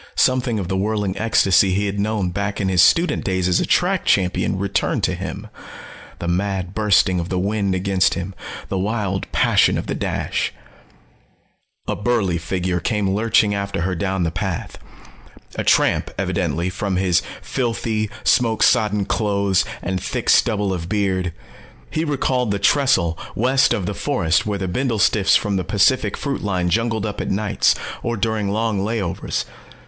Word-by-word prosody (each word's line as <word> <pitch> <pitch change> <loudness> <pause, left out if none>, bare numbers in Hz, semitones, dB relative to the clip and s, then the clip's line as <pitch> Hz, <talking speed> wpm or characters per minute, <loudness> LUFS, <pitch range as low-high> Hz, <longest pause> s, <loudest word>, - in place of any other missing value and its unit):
Something 125 -3 +2
of 95 -4 -3
the 95 - -2
whirling 100 0 -1
ecstasy 95 -4 +3
he 100 +1 0
had 100 0 -3
known 105 -3 -1
back 100 +2 -3
in 95 -2 0
his 90 -2 +4
student 170 - +3
days 95 -2 0
as 90 - +2
a - - -1
track - - +2
champion 95 0 +1
returned 100 +1 -1
to - - +1
him - - -6 0.7
the 85 - -5
mad 95 0 -1
bursting 100 -4 +3
of 85 +1 -4
the 95 - -1
wind 100 0 0
against 95 0 +1
him, 95 +2 -5 0.3
the 95 - -2
wild 100 -1 -2
passion - - +3
of - - -3
the - - -3
dash. - - -2 1.3
A - - -1
burly 105 -6 0
figure 90 +1 -2
came 105 -1 -1
lurching 105 0 +2
after 100 -3 -3
her 95 +2 -1
down 95 +1 -1
the 80 - 0
path. - - -4 0.8
A - - -2
tramp, - - +2
evidently, 85 +3 -1
from 95 +1 -2
his 90 -2 +2 0.2
filthy, 115 -4 -2
smoke 115 -3 +2
sodden 105 -2 +3
clothes 100 -3 +1 0.2
and 95 +1 -2
thick - - -1
stubble 105 -4 +2
of 85 -2 -5
beard. 95 -3 0 0.6
He 160 - -1
recalled 130 -5 0
the 100 - 0
trestle 100 - +2 0.2
west 130 +4 +3
of 95 - 0
the 105 - -2
forest 100 - 0
where 105 -1 -1
the 95 -1 -3
bindlestiffs 110 -1 +2
from 100 -3 -2
the 95 - -1
Pacific 105 +2 +2
Fruit 140 -2 -3
line 90 -4 -1
jungled 115 0 0
up 105 -2 -4
at - - -3
nights, 105 +1 +2 0.3
or 120 -1 -2
during 110 -1 -1
long 110 0 0
layovers. 100 -3 -2
100 Hz, 165 wpm, -20 LUFS, 95-110 Hz, 1.3 s, his